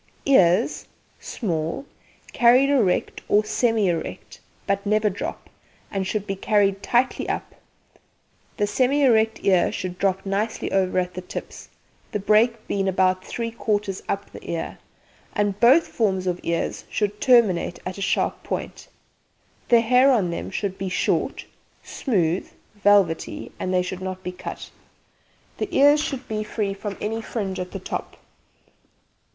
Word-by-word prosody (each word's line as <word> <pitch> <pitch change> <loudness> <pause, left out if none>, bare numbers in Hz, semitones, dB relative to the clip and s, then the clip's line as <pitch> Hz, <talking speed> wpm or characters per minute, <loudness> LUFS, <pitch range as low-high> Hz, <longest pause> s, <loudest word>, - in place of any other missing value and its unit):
EARS 185 -11 +3 0.3
Small, 165 - -3 0.5
carried 255 +3 +5
erect 220 -10 +1
or 210 +1 +3
semi 225 -2 +1
erect, 170 -2 -4 0.3
but 200 0 0
never 210 0 +2
drop, 190 - -6 0.4
and 195 -1 -2
should 210 0 -2
be 195 - -3
carried 195 -1 +1
tightly 250 +2 +1
up. - - -3 1.0
The 205 - +2
semi 265 +7 +2
erect 225 -3 +3
ear 185 -3 +4
should 185 -2 -5
drop 195 0 0
nicely 205 +3 -2
over 190 -1 +1
at 180 0 0
the 185 - -5
tips, 180 - -8 0.4
the - - +1
break 215 +3 +2
being 195 -1 -1
about 185 0 +2
three 230 -1 -4
quarters 205 -3 -2
up 200 +1 -3
the - - -11
ear, 165 - -4 0.6
and 205 -1 0
both 260 +9 +6
forms 190 -5 0
of 180 -1 -1
ears 170 0 -2
should 210 0 -2
terminate 220 -9 +4
in 185 - -2
a 200 - -9
sharp 195 - 0
point. - - -5 0.8
The 235 -1 +6
hair 250 +4 +5
on 200 -9 +2
them 170 - -4
should 195 -1 -3
be 190 0 -2
short, 185 - -1 0.4
smooth 180 - -1 0.2
(velvety), 205 -5 +2
and 185 - -2
they 180 -1 +2
should 185 +1 -5
not 185 0 -5
be 180 - -3
cut. 180 - -8 0.9
The - - -2
ears 290 +2 +5
should 270 -4 -4
be 215 -1 -2
free 210 -2 -2
from 200 0 -6
any 225 +2 -2
fringe 200 -5 -4
at 180 0 -4
the - - -5
top. 185 - -6
200 Hz, 150 wpm, -23 LUFS, 185-225 Hz, 1.0 s, both